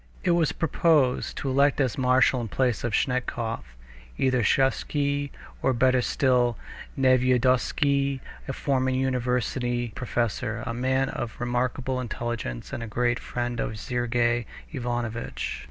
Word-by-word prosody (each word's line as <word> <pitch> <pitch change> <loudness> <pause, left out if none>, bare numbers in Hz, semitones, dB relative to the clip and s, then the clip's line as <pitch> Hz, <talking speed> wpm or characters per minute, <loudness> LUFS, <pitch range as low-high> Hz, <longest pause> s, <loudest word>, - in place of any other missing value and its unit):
It 175 - +3
was 170 -3 +3
proposed 155 -5 +2
to 135 - -2
elect 140 +2 +3
as 130 -5 +1
marshal 130 0 +3
in 115 - -3
place 125 0 0
of 120 -2 -2
Snetkov 120 -3 -1 0.6
either 130 -2 +2
Sviazhsky, 140 +4 +1 0.3
or, 130 - +2
better 130 +1 +3
still, 125 -3 +2 0.4
Nevyedovsky, 130 +2 +3 0.3
a 135 - -2
former 130 -1 0
university 125 -1 0
professor, 120 -2 -2
a 115 - -3
man 130 +2 +1
of 115 - -4
remarkable 125 +1 -1
intelligence 120 - -4
and - - -3
a 115 - -4
great 120 +2 0
friend 120 -1 -3
of 110 - -2
Sergey 120 0 0 0.2
Ivanovitch. 120 -4 -3
125 Hz, 125 wpm, -26 LUFS, 120-130 Hz, 0.6 s, It